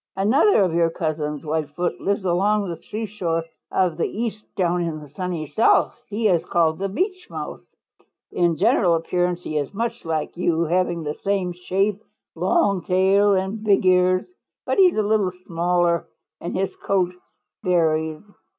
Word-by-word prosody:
"Another 215 Hz, -, +4 dB
of 180 Hz, -3 st, 0 dB
your 165 Hz, 0 st, +3 dB
cousins, 155 Hz, -3 st, -3 dB
Whitefoot, 155 Hz, +2 st, -2 dB
lives 200 Hz, 0 st, -1 dB
along 200 Hz, +3 st, +2 dB
the 170 Hz, -, -6 dB
seashore 200 Hz, -6 st, -3 dB, 0.3 s
of 180 Hz, -4 st, +1 dB
the 170 Hz, -, 0 dB
East 215 Hz, -1 st, -4 dB
down 175 Hz, -2 st, +1 dB
in 165 Hz, -2 st, -3 dB
the 150 Hz, -1 st, -12 dB
Sunny 175 Hz, 0 st, -3 dB
South. 220 Hz, +8 st, +2 dB
He 215 Hz, +2 st, 0 dB
is 175 Hz, -5 st, +2 dB
called 160 Hz, -1 st, +1 dB
the 195 Hz, 0 st, -2 dB
Beach 370 Hz, -, -2 dB
Mouse. -, -, -6 dB, 0.7 s
In 170 Hz, -2 st, +1 dB
general 170 Hz, +3 st, +3 dB
appearance 175 Hz, +1 st, -1 dB
he 155 Hz, -1 st, -2 dB
is 145 Hz, -, -4 dB
much 230 Hz, +2 st, -3 dB
like 160 Hz, -2 st, -2 dB
you, 170 Hz, -1 st, +1 dB
having 175 Hz, 0 st, 0 dB
the 150 Hz, 0 st, -5 dB
same 195 Hz, -2 st, 0 dB
shape, 195 Hz, +3 st, -1 dB, 0.3 s
long 200 Hz, -, +1 dB
tail 195 Hz, +3 st, +3 dB
and 190 Hz, +3 st, -2 dB
big 200 Hz, -3 st, +3 dB
ears, 185 Hz, 0 st, +4 dB, 0.4 s
but -, -, 0 dB
he 380 Hz, -, +8 dB
is 355 Hz, -, -1 dB
a 215 Hz, -, +2 dB
little 205 Hz, -3 st, +1 dB
smaller 175 Hz, 0 st, +1 dB, 0.3 s
and 170 Hz, -, -4 dB
his 190 Hz, 0 st, -2 dB
coat 185 Hz, -2 st, 0 dB, 0.5 s
varies. 160 Hz, -4 st, +1 dB
180 Hz, 160 wpm, -22 LUFS, 165-200 Hz, 0.7 s, he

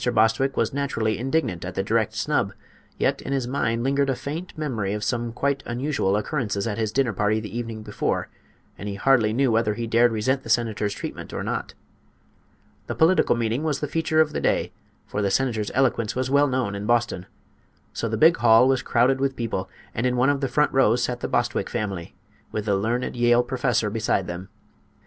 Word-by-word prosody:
Bostwick 115 Hz, +5 st, +2 dB
was -, -, +1 dB
naturally 115 Hz, -7 st, -1 dB
indignant 130 Hz, -, -1 dB
at 90 Hz, 0 st, -6 dB
the 95 Hz, -, 0 dB
direct 110 Hz, +1 st, 0 dB
snub; -, -, 0 dB, 0.4 s
yet -, -, 0 dB
in 140 Hz, -, -4 dB
his 130 Hz, -3 st, -1 dB
mind 115 Hz, -3 st, -1 dB
lingered 140 Hz, +1 st, +1 dB
a 135 Hz, -, +1 dB
faint 160 Hz, +8 st, -5 dB
memory 115 Hz, -10 st, -2 dB
of 105 Hz, -, -4 dB
some 120 Hz, -2 st, -1 dB
quite 140 Hz, +3 st, -1 dB
unusual 120 Hz, -5 st, 0 dB
occurrences 105 Hz, -4 st, -2 dB
at 115 Hz, -1 st, -3 dB
his 110 Hz, -2 st, 0 dB
dinner 125 Hz, -1 st, +1 dB
party 105 Hz, +2 st, +1 dB
the 110 Hz, 0 st, -8 dB
evening 115 Hz, -2 st, -4 dB
before, -, -, -2 dB, 0.5 s
and 105 Hz, -, -5 dB
he 100 Hz, -, -4 dB
hardly 115 Hz, -1 st, +3 dB
knew 130 Hz, +2 st, +2 dB
whether 110 Hz, -2 st, +1 dB
he 115 Hz, +1 st, -3 dB
dared 115 Hz, +1 st, +4 dB
resent 130 Hz, +5 st, 0 dB
the 115 Hz, -, -11 dB
senator's 110 Hz, -3 st, 0 dB
treatment -, -, -7 dB
or -, -, -3 dB
not. -, -, -4 dB, 1.1 s
The -, -, -3 dB
political 165 Hz, -4 st, +4 dB
meeting 115 Hz, +2 st, -1 dB
was 150 Hz, -3 st, 0 dB
the 150 Hz, -, -2 dB
feature 160 Hz, +1 st, 0 dB
of 155 Hz, -1 st, +3 dB
the -, -, -2 dB
day, -, -, +1 dB, 0.3 s
for 105 Hz, -, -3 dB
the 100 Hz, -, +1 dB
senator's 110 Hz, -1 st, 0 dB
eloquence 120 Hz, -4 st, +1 dB
was 130 Hz, +1 st, -1 dB
well 145 Hz, +1 st, +4 dB
known 125 Hz, -6 st, -1 dB
in 100 Hz, +1 st, -5 dB
Boston. 120 Hz, -6 st, 0 dB, 0.7 s
So 115 Hz, -, -2 dB
the 110 Hz, -, -1 dB
big 165 Hz, +5 st, +6 dB
hall 115 Hz, +1 st, +6 dB
was 130 Hz, -1 st, +2 dB
crowded 130 Hz, +3 st, +2 dB
with 135 Hz, -1 st, 0 dB
people, 100 Hz, -6 st, -3 dB, 0.2 s
and 120 Hz, +3 st, 0 dB
in 125 Hz, 0 st, 0 dB
one 130 Hz, +3 st, +4 dB
of 140 Hz, -1 st, -2 dB
the 135 Hz, -, +1 dB
front 150 Hz, +3 st, +2 dB
rows 125 Hz, -2 st, +3 dB
sat 125 Hz, -1 st, -2 dB
the -, -, -3 dB
Bostwick 120 Hz, 0 st, 0 dB
family, 100 Hz, -7 st, -4 dB, 0.4 s
with 105 Hz, -1 st, -3 dB
the 100 Hz, -2 st, +2 dB
learned 115 Hz, +7 st, -1 dB
Yale 120 Hz, 0 st, +4 dB
professor 125 Hz, -4 st, 0 dB
beside 110 Hz, -3 st, 0 dB
them. 90 Hz, +2 st, -7 dB
120 Hz, 205 wpm, -24 LUFS, 110-135 Hz, 1.1 s, big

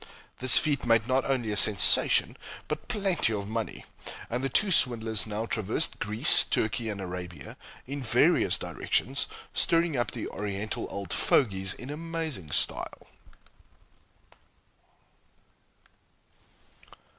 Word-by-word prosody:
This 130 Hz, 0 st, +5 dB
feat 150 Hz, -2 st, 0 dB
made 115 Hz, -1 st, +2 dB
not 130 Hz, 0 st, 0 dB
only 120 Hz, -5 st, -1 dB
a -, -, -2 dB
sensation 105 Hz, -2 st, +4 dB, 0.3 s
but -, -, -5 dB
plenty 195 Hz, -, -1 dB
of 100 Hz, -1 st, -4 dB
money; 110 Hz, 0 st, -5 dB, 0.5 s
and 125 Hz, +3 st, -3 dB
the 135 Hz, -, -1 dB
two 200 Hz, +9 st, +2 dB
swindlers 115 Hz, -, +3 dB
now 110 Hz, +1 st, -4 dB
traversed 110 Hz, +7 st, -2 dB
Greece, 105 Hz, +7 st, +5 dB
Turkey, 110 Hz, +1 st, -2 dB
and 105 Hz, -2 st, -5 dB
Arabia, 90 Hz, -5 st, -8 dB, 0.3 s
in 140 Hz, +2 st, -6 dB
various 120 Hz, -, +2 dB
directions, -, -, -2 dB, 0.3 s
stirring 165 Hz, -2 st, +1 dB
up 120 Hz, -1 st, -1 dB
the -, -, -6 dB
Oriental 105 Hz, +1 st, -5 dB
"old 100 Hz, -3 st, -6 dB
fogies" 95 Hz, -7 st, +1 dB
in 130 Hz, +3 st, -9 dB
amazing 160 Hz, -, -6 dB
style. -, -, -3 dB
115 Hz, 115 wpm, -27 LUFS, 100-140 Hz, 0.5 s, This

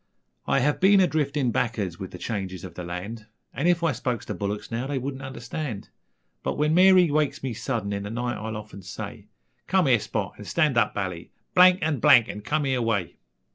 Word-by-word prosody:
I 135 Hz, -, +2 dB
have 150 Hz, +3 st, +1 dB
been 195 Hz, +1 st, +6 dB
a 190 Hz, -, +6 dB
driftin' 145 Hz, -5 st, 0 dB
back'ards 105 Hz, -8 st, -2 dB
with 95 Hz, -, -6 dB
the -, -, -9 dB
changes 95 Hz, -3 st, -4 dB
ov 90 Hz, -, -9 dB
the 90 Hz, -, -7 dB
land, 100 Hz, +6 st, -6 dB, 0.3 s
An' 150 Hz, -, 0 dB
if 175 Hz, -1 st, +2 dB
I 165 Hz, -, +3 dB
spoke 125 Hz, -2 st, -3 dB
ter -, -, -4 dB
bullicks 105 Hz, +2 st, -4 dB
now 120 Hz, +3 st, -2 dB
they 140 Hz, -1 st, -2 dB
wouldn't 135 Hz, +1 st, -4 dB
understand, 130 Hz, -3 st, -6 dB, 0.5 s
But -, -, -3 dB
when 150 Hz, +1 st, +2 dB
Mary 185 Hz, -2 st, +6 dB
wakes 150 Hz, -2 st, 0 dB
me 130 Hz, -3 st, -2 dB
sudden 110 Hz, -3 st, -3 dB
in 100 Hz, -, -3 dB
the 100 Hz, -, -5 dB
night 120 Hz, +2 st, -2 dB
I'll 110 Hz, 0 st, -5 dB
often 105 Hz, -2 st, -10 dB
say: 100 Hz, +2 st, -8 dB, 0.4 s
'Come 190 Hz, -2 st, +3 dB
here, 125 Hz, -4 st, +4 dB
Spot, 105 Hz, -2 st, -3 dB
an' 105 Hz, -, -8 dB
stan' 150 Hz, +2 st, +1 dB
up, 115 Hz, -3 st, +2 dB
Bally, 90 Hz, -4 st, -4 dB, 0.2 s
blank 180 Hz, 0 st, +6 dB
an' 155 Hz, -4 st, 0 dB
blank 115 Hz, 0 st, +6 dB
an' 105 Hz, -, -6 dB
come 150 Hz, +7 st, -1 dB
eer 130 Hz, -2 st, 0 dB
way.' 105 Hz, -7 st, -1 dB
120 Hz, 215 wpm, -25 LUFS, 105-150 Hz, 0.5 s, been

